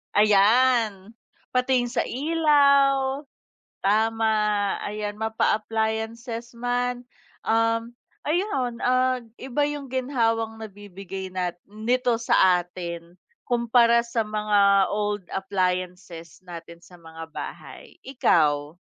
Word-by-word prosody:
Ayan, 215 0 +3 0.4
pati 250 0 +2
'yung 240 - -5
sa - - 0
ilaw. 280 -2 +2 0.6
Tama, 220 +2 +2 0.5
ayan 210 0 -4
mapa-appliances 220 +2 -2
man, 245 0 -2 0.4
um 230 +1 +1 0.3
ayun 285 - -1
at 255 0 +2 0.2
iba 265 +2 -2
'yung 290 -1 -4
ginhawang 230 -4 -1
nabibigay 195 -3 -8
nat 180 -2 -3
nito 230 +3 -1
sa 185 -5 +4
atin, 170 -1 -8 0.3
kumpara 235 -1 +3
sa 235 -2 -2
mga 205 -2 +3
old 205 -1 -2
appliances 180 -3 -3
natin 170 -1 -11
sa 180 -1 -16
mga 160 -1 -11
bahay, - - -9
ikaw? 150 - +1
220 Hz, 95 wpm, -24 LUFS, 195-245 Hz, 0.6 s, sa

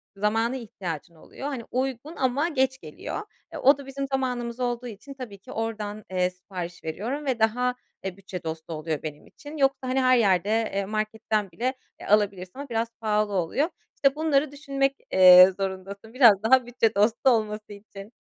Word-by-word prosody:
zamana 225 +5 +1
ihtiyacın 180 - -6
oluyor. 265 - -8
Hani, 265 -5 -4
uygun 265 +4 -3
ama 265 +5 +1
geç 265 -3 +1
geliyor. - - -6 0.3
E, - - -6
o 275 +2 +5
da 280 - -10
bizim 275 0 -4
zamanımız 250 -3 -2
olduğu 245 0 -2
için 235 +5 -10
tabii 250 -7 -8
ki 195 - -13
oradan, 215 -2 -4
eee, 180 -1 +1
sipariş 180 -2 -8
veriyorum 230 - -4
ve 260 -4 -1
daha, 250 +3 +2 0.3
eee, 190 -1 -5
bütçe 190 -2 -8
dostu 160 0 -5
oluyor 155 -1 -3
benim 150 -1 -7
için. 300 +2 -11
Yoksa, 270 -2 +1
hani, 265 +1 +2
her 255 0 +5
yerde, 195 -4 +3
eee, 215 -3 0
marketten 215 -1 -2
bile, 245 +10 -1 0.3
eee, - - -9
alabilirsin 200 -3 +2
ama 280 -1 -7
biraz 230 0 0
pahalı 210 -1 +1
oluyor. 195 - 0 0.3
İşte, 275 0 +2
bunları 300 -2 +1
düşünmek, 275 -1 -1 0.2
eee, 185 0 +9
zorundasın 195 +3 -5
biraz 230 -6 +6
daha 255 +2 +5
bütçe 230 -2 0
dostu 225 +6 +3
olması 215 -3 -1
için. 200 0 -12
225 Hz, 175 wpm, -26 LUFS, 195-260 Hz, 0.3 s, eee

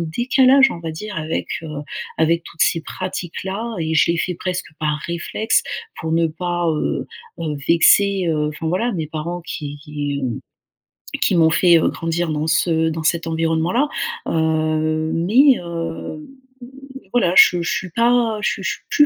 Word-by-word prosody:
décalage 260 - +4
on 170 - -6
va 165 -1 -4
dire 205 +5 -7
avec, 155 +1 -3
heu, 160 - -7 0.5
avec 165 +1 +2
toutes 170 - -3
ces 165 - +2
pratiques-là. 190 +6 -5
Et 160 0 -1
je 155 - +4
les - - -2
fais 180 +1 -1
presque 180 +1 -4
par 150 -1 0
réflexe 170 +6 0 0.4
pour 160 - -3
ne 165 0 +3
pas, 175 +1 -2
heu, 155 - -2 0.3
heu, 155 -3 -2
vexer, 195 +3 +4
heu, 150 -1 0
enfin 155 +2 -4
voilà 225 +8 0
mes 160 -5 -3
parents 155 0 -5 0.2
qui 145 -3 -6
qui 145 -1 -4 1.0
qui - - +2
m'ont 165 -2 +5
fait, 170 0 +5
heu, - - +2
grandir 165 0 -2
dans 150 +1 -2
ce 160 0 +2
dans 160 0 -4
cet 165 +1 0
environnement-là. 165 - +1 0.4
Heu, 155 0 0
mais, 235 - +4
heu, 165 -2 -6 0.9
voilà 210 -8 +2
je 175 -1 +7
je 170 - -2
suis 190 - -3
pas 235 +1 +2
je - - +1
suis - - -7
je - - 0
suis - - -3
je - - -3
suis 295 - +9
165 Hz, 170 wpm, -20 LUFS, 160-185 Hz, 1.0 s, suis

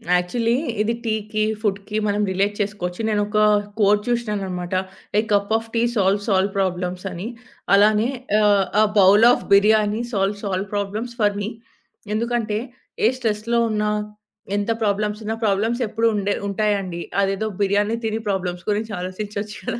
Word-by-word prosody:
Actually 230 +7 +1 0.3
ఇది 225 +2 +1
టీకి, 215 -1 -1 0.2
ఫుడ్‌కి 205 0 -2
మనం 205 0 +1
రిలేట్ 200 +2 0
చేసుకోవచ్చు. 195 -2 -3
నేనొక 210 0 0 0.4
coat 205 0 +4
చూషినాన్నమాట. 200 -7 -2 0.5
A - - +4
cup 200 +1 +2
of 225 0 -8
tea 230 - +2
solve 200 0 +1
all 190 +1 +2
problems 180 -1 -2
అని. 180 +4 -5 0.5
అలానే 210 +3 +4 0.3
ఆహ్, 205 -2 +4 0.2
ఎ - - +6 0.2
bowl 200 +3 +7
of - - 0
biryani 210 +2 +4
solve 200 +1 -1
all 190 +1 -1
problems 210 +4 -3
for 205 -1 +2
మి. 205 - -2 0.7
ఎందుకంటే 230 -2 -1 0.5
ఏ - - +6
స్ట్రెస్‌లో 230 0 0
ఉన్న, 210 -1 0 0.7
ఎంత 205 +2 0
ప్రాబ్లమ్స్ 210 +1 0
ఉన్న, 220 +1 -1
ప్రాబ్లమ్స్ 220 +5 +1
ఎప్పుడు 225 +2 +1
ఉండే 205 0 0 0.2
ఉంటాయండి. 200 -4 -1 0.2
అదేదో 195 +2 0
బిర్యానీ 205 +3 +1
తిని 220 0 -1
ప్రాబ్లమ్స్ 180 -2 -2
గురించి 215 +2 -2
ఆలోచించొచ్చు 205 +3 -5
కదా! 230 - -2
205 Hz, 140 wpm, -22 LUFS, 195-215 Hz, 0.7 s, bowl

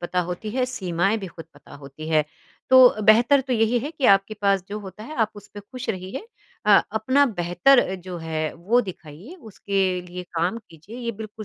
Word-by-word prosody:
पता 180 +1 -1
होती 210 +5 -5
है, 255 +3 0
सीमाएँ 190 -1 -1
भी 195 - -7
खुद 165 -2 -11
पता 145 0 -16
होती 145 +2 -10
है। 155 -2 +2 0.5
तो 250 -4 +7
बेहतर 235 +6 +5
तो 260 -1 -4
यही 225 +1 +2
है 285 +6 -5
कि 300 -5 -6
आपके 195 +2 +3
पास 195 -2 +2
जो 210 +1 -5
होता 195 +2 -10
है 310 - -9
आप 215 - -1
उस 205 0 -12
पे 205 - -7
खुश 255 +4 -10
रहिए 190 - -6 0.4
अ, 205 - +7
अपना 260 +6 +2
बेहतर 180 +6 +2
अ, 190 - -3
जो 180 -1 -8
है, 155 -1 -3
वो 210 +9 +1
दिखाइए, 185 - -10
उसके 195 - -2
लिए 180 0 -8
काम 175 +7 -1
कीजिए, 165 +9 -13
ये 235 -1 -4
बिल्कुल 215 0 -9
200 Hz, 205 wpm, -23 LUFS, 175-235 Hz, 0.5 s, तो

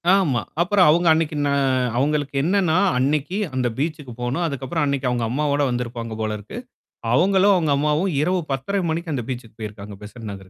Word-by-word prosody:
ஆமா. 145 - +1 0.2
அப்புறம் 180 -1 +4
அவுங்க 170 +2 +3
அன்னைக்கி 160 -1 0
ந - - +1 0.5
அவங்களுக்கு 145 +1 0
என்னன்னா, 180 -2 +2 0.2
அன்னைக்கி 145 +8 0 0.2
அந்த 125 -1 +1
பீச்சுக்கு 150 -3 -3
போணும். 135 +8 -1
அதுக்கப்புறம் 140 +2 -2
அன்னைக்கி 140 -2 -1
அவுங்க 120 -2 0
அம்மாவோட 145 +3 0
வந்திருப்பாங்க 120 -2 -4
போலருக்கு. 105 - -4 0.6
அவுங்களும், 195 +5 +4
அவுங்க 160 -4 +1
அம்மாவும் 150 +5 +1
இரவு 180 +4 +1
10:30 190 +10 -1
மணிக்கு 165 0 -3
அந்த 120 -4 -2
பீச்சுக்கு 120 -3 -7
போயிருக்காங்க. 105 -1 -7
பெசட் 105 +4 -11
நகருக்கு. 105 -3 -5
145 Hz, 160 wpm, -22 LUFS, 120-170 Hz, 0.6 s, அப்புறம்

